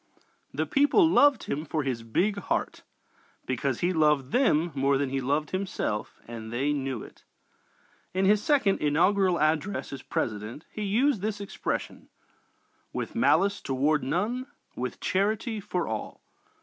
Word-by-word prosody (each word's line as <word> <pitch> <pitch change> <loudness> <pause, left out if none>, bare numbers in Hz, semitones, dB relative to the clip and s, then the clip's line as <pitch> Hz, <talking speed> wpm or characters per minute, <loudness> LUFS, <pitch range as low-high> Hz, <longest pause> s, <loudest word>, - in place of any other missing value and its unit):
The - - -1
people 290 +6 +4
loved 290 -4 +5
him 150 - -3
for 155 -1 -2
his 130 -4 -2
big 190 - 0
heart - - -2 0.6
because 130 0 -1
he 180 +2 +2
loved 150 -4 +2
them 175 - +3
more 140 0 +2
than 140 -1 -1
he 135 0 -1
loved 145 +4 -1
himself 185 - -3
and 115 -1 -7
they 135 +5 0
knew 135 -5 -3
it. - - -15 0.9
In 190 +1 +1
his 205 +1 +4
second 265 -7 +2
inaugural 180 +5 +3
address 155 +4 0
as 135 - -6
President 110 +6 -4
he 215 - -6
used 220 +3 +2
this 210 0 -2
expression: 200 0 -4 0.8
"With - - -4
malice 200 -3 +3
toward 145 +3 +1
none, 215 - -1 0.3
with - - -4
charity 215 +3 0
for 185 -3 -2
all." 110 -1 -5
165 Hz, 145 wpm, -27 LUFS, 135-205 Hz, 0.9 s, loved